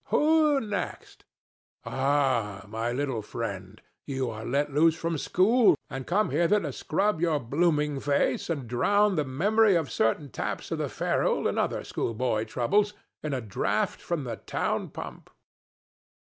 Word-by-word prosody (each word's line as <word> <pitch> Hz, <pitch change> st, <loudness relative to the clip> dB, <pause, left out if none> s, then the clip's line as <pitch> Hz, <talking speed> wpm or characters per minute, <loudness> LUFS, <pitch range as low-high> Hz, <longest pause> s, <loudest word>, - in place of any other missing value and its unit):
—Who 305 Hz, -2 st, +3 dB
next?—Oh, 135 Hz, -, -3 dB
my 110 Hz, +3 st, -3 dB
little 130 Hz, -3 st, -2 dB
friend, 100 Hz, -3 st, -6 dB, 0.3 s
you 130 Hz, -3 st, -2 dB
are 110 Hz, 0 st, -7 dB
let 140 Hz, +4 st, -1 dB
loose 160 Hz, +2 st, +4 dB
from 165 Hz, -2 st, -2 dB
school 220 Hz, -, +4 dB, 0.2 s
and 135 Hz, -1 st, -5 dB
come 200 Hz, -2 st, +1 dB
hither 170 Hz, +8 st, +3 dB
to 150 Hz, -8 st, -4 dB
scrub 185 Hz, +4 st, 0 dB
your 165 Hz, -4 st, +2 dB
blooming 150 Hz, +2 st, +1 dB
face 140 Hz, +4 st, 0 dB
and 140 Hz, -7 st, -2 dB
drown 205 Hz, -, +2 dB
the 150 Hz, -, +1 dB
memory 200 Hz, +10 st, +3 dB
of 160 Hz, -5 st, 0 dB
certain 130 Hz, +5 st, 0 dB
taps -, -, -4 dB
of -, -, -2 dB
the -, -, -1 dB
ferule, -, -, 0 dB
and -, -, -1 dB
other -, -, -1 dB
schoolboy 115 Hz, -1 st, -1 dB
troubles, 200 Hz, -, +1 dB, 0.3 s
in 150 Hz, -, -3 dB
a 130 Hz, -, -2 dB
draught 105 Hz, -4 st, -1 dB
from 170 Hz, -4 st, -2 dB
the 115 Hz, -4 st, -5 dB
town -, -, -2 dB
pump? -, -, -9 dB
145 Hz, 145 wpm, -27 LUFS, 120-180 Hz, 0.3 s, loose